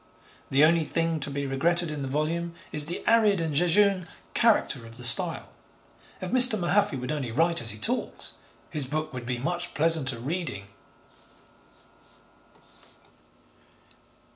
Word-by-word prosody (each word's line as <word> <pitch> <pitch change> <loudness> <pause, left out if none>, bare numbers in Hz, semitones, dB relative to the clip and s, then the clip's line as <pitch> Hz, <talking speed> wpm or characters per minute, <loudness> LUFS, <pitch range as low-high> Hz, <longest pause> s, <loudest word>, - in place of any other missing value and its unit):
The 140 +3 +5
only 165 +1 +3
thing 165 +1 -1
to 140 - -3
be 140 0 -4
regretted 165 +5 0
in 150 -2 -5
the 135 - -4
volume 165 +5 -2 0.2
is 150 -1 +1
the 175 - -5
arid 215 -4 +4
and 160 -2 -2
jejune 180 +3 +3 0.3
character 210 - +2
of 115 +1 -14
the 125 - -10
style. 120 - +1 0.7
If 185 0 -6
Mr. 250 -3 +7
Mahaffy 195 -3 +1
would 125 +3 -5
only 140 -6 -3
write 165 +5 +1
as 115 - 0
he 105 - -3
talks, 105 - -2 0.4
his 150 -3 +1
book 155 +3 -4
would 125 -2 -7
be 125 -1 -2
much 175 +7 -4
pleasanter 155 -5 +2
reading. 135 - -4
155 Hz, 140 wpm, -26 LUFS, 135-175 Hz, 0.7 s, Mr